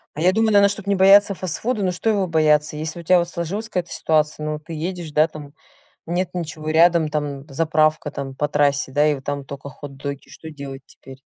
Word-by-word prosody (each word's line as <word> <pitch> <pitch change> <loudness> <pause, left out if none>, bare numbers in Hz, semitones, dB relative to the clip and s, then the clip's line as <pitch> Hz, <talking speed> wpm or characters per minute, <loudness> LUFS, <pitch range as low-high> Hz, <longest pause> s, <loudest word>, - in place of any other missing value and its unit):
А - - -6
я 180 +2 +4
думаю, 220 +1 +2
наверно, 200 -1 +6
чтобы 200 0 -5
не 200 - +3
бояться 200 +2 +6
фастфуда 200 +5 -2
ну 185 - +1
что 200 +5 -1
его 200 -3 +1
бояться? 150 -2 +2
Если 155 +3 -5
у - - -9
тя 180 +2 +5
вот 170 0 -2
сложилась 190 +6 -4
какая-то 180 -5 -3
ситуация, 155 -1 0
ну 155 0 -3
ты 165 +2 -10
едешь, 170 0 -5
да, 155 +2 +4
там, 150 -3 -11 0.5
нет 175 +2 -1
ничего 155 -3 -5
рядом, 165 0 +4
там 145 -2 -4
заправка 155 +1 +1
там 135 -1 -6
по 145 +2 -1
трассе, 140 -2 +1
да, 145 +2 +3
и 150 - +1
вот 135 - -11
там 140 0 -4
тока 140 +1 -8
хот-доги, 140 +1 -8
что 160 - -10
делать 140 -2 -8
теперь? 135 0 -15
155 Hz, 215 wpm, -21 LUFS, 145-180 Hz, 0.5 s, наверно